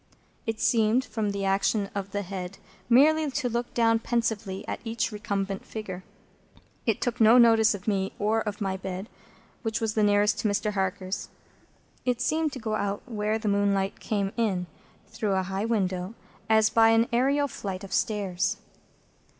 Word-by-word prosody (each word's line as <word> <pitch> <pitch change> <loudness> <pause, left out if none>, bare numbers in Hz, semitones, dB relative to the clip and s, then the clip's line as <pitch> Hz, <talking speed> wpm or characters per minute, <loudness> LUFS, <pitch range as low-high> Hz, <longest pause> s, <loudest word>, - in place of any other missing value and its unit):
It 225 -1 -2
seemed, 230 +3 +3
from 220 -3 -2
the 200 -1 -2
action 195 +1 +1
of 200 -1 -4
the 205 +1 -3
head, 185 0 -6 0.3
merely 300 +5 +5
to 255 -1 -1
look 240 0 -2
down 225 -1 +3
pensively 225 -5 -2
at - - -3
each 230 0 -2
recumbent 195 -2 -3
figure. 190 -4 -7 0.8
It 225 - +1
took 245 -1 -1
no 225 +3 +7
notice 225 -3 +6
of 200 +1 -11
me, 195 -2 0
or 220 +2 +1
of 210 -1 -5
my 190 -1 -1
bed, 190 +3 -6 0.5
which 220 -3 -2
was 225 -1 -1
that 220 - +1
nearest 205 0 +3
to - - +1
Mr. 210 +1 0
Harker's. 190 0 -2 0.7
It 250 -2 0
seemed 310 +4 +1
to 260 - -6
go 220 -2 -3
out 205 -1 -2
where 215 -2 -1
the 220 -1 -4
moonlight 200 -1 +1
came 200 -2 -2
in, 195 -6 0 0.4
through 210 -3 -2
a 190 0 +1
high 190 +3 -3
window, 190 -3 -1 0.3
as 220 0 +4
by 225 -1 +5
an 225 0 +4
aërial 280 +4 +2
flight 195 -7 -6
of 195 - -7
stairs. 195 -1 0
210 Hz, 170 wpm, -27 LUFS, 195-230 Hz, 0.8 s, no